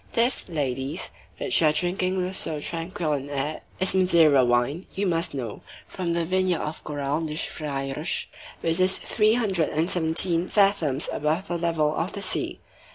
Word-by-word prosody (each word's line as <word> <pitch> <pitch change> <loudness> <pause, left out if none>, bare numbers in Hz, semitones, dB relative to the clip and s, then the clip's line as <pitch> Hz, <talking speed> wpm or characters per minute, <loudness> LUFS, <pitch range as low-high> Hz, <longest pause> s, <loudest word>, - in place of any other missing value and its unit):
This, 235 -3 +1
ladies, 140 0 -2 0.3
which 370 - 0
you 160 - +5
are - - +5
drinking 185 +3 0
with 185 +1 -5
so 155 -4 0
tranquil 165 0 -3
an 140 0 -3
air 145 +2 -2 0.2
is 190 - +3
Madeira 165 -7 +5
wine, 120 +8 +1
you 200 - 0
must 165 -4 0
know, 120 -6 -5 0.2
from 175 -3 -3
the 170 -1 0
vineyard 185 0 +1
of 150 +1 -5
Coural 145 +1 -2
das 155 -1 -1
Freiras, 140 +1 -2 0.4
which 165 +1 +1
is 185 +1 +5
three 215 0 +2
hundred 195 -9 +1
and 160 +4 0
seventeen 170 +1 +1
fathoms 195 -9 +2
above 155 +5 -1
the 175 - -1
level 160 -3 +1
of 165 +4 -2
the 200 - -4
sea. 185 - -2
165 Hz, 170 wpm, -25 LUFS, 150-185 Hz, 0.4 s, you